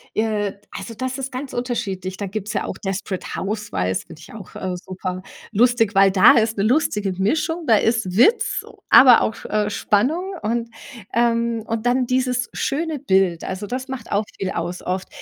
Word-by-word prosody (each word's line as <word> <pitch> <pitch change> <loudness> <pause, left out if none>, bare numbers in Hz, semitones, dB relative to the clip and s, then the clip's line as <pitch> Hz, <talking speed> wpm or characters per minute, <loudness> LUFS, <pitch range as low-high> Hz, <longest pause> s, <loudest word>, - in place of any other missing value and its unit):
äh, 210 -2 0 0.2
also, 195 +4 -7
das 260 +3 -3
ist 270 0 -4
ganz 260 +2 -6
unterschiedlich. 200 -7 -3
Da 200 - -3
gibt's 205 +1 -5
ja - - -1
auch - - -5
„Desperate 195 -1 -4
Houswives“, 140 - -2
finde - - -13
ich 160 - -13
auch, 215 -4 -11
äh, 185 -1 -3
superlustig, 195 +5 -1
weil 195 0 +5
da 190 -1 +7
ist 225 0 +1
'ne 200 - +1
lustige 210 -5 +1
Mischung, 310 - -1
da 225 - +6
ist 220 -5 0
Witz, 355 - +3 0.2
aber 250 -3 +8
auch, 220 - -3
äh, 210 -1 0
Spannung. 270 - 0
Und 230 +2 -2 0.4
ähm, 235 -1 +1
und 225 0 -3
dann 250 +1 +2
dieses 250 -1 0
schöne 315 +2 -2
Bild, 190 -7 +1
also, 190 +2 -5
das 255 +4 -4
macht 260 -3 -7
auch 210 +1 +1
viel 190 - -2
aus. 175 +2 -4
Oft 185 +1 -3
215 Hz, 175 wpm, -21 LUFS, 195-245 Hz, 0.4 s, aber